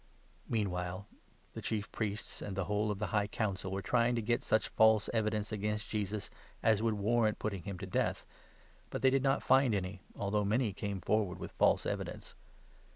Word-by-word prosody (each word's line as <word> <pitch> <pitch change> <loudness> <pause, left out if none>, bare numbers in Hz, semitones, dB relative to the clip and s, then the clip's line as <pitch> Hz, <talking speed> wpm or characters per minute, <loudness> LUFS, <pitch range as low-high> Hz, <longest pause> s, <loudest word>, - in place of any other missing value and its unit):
Meanwhile 95 -3 -1 0.5
the - - -6
Chief 105 -2 -2
Priests 105 -1 -3
and 95 -2 -5
the 95 - +1
59 - - -6
whole 105 +3 0
of 105 - -1
the 105 - -1
High 105 -1 +2
Council 100 -3 -2
were 95 0 -3
trying 120 +3 +2
to 115 - 0
get 120 +2 +1
such 110 - +2
false 110 -1 +4
evidence 110 -2 0
against 105 +1 -2
Jesus, 105 -1 -2 0.3
as 110 -2 +4
would 115 -1 +1
warrant 110 +1 +2
putting 100 -4 -3
him 100 -2 -4
to 95 - -6
death, 95 - -1 0.6
but - - -5
they 130 - +7
60 - - -1
did 135 - -2
not 135 -1 +2
find 130 -4 +4
any, 95 -1 -3
although 105 +1 0
many 110 +1 +1
came 100 -1 -4
forward 100 0 +1
with - - -7
false - - +3
evidence. - - -4
105 Hz, 195 wpm, -33 LUFS, 100-110 Hz, 0.6 s, they